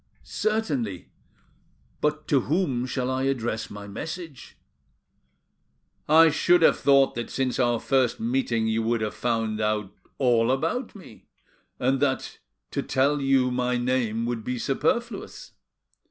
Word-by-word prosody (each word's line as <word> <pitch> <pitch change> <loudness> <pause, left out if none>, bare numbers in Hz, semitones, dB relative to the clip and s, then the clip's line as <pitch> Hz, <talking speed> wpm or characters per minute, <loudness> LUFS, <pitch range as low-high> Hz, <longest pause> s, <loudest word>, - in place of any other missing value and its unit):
"Certainly. 145 - -2 0.9
But 150 0 -1
to 140 - +4
whom 135 -5 -1
shall 130 0 -2
I 130 +1 -1
address 120 -4 -2
my 105 0 -9
message?" 155 - -8 1.5
"I 160 +1 +7
should 175 +3 +3
have - - +5
thought 140 -1 +4
that 120 0 -5
since 130 -2 -2
our 120 -2 +2
first 130 -2 +1
meeting 115 -1 0
you 110 0 0
would 115 0 0
have 105 -1 -2
found 115 -2 -1
out 105 -2 -1 0.2
all 120 -4 +3
about 220 - -1
me, 180 - -14 0.5
and 130 +2 +1
that 135 -1 -1 0.3
to - - -1
tell 140 +2 +1
you 135 -2 +2
my 125 0 0
name 120 -2 0
would 120 -2 -3
be 125 +2 -3
superfluous. 195 - -2
130 Hz, 135 wpm, -25 LUFS, 115-140 Hz, 1.5 s, I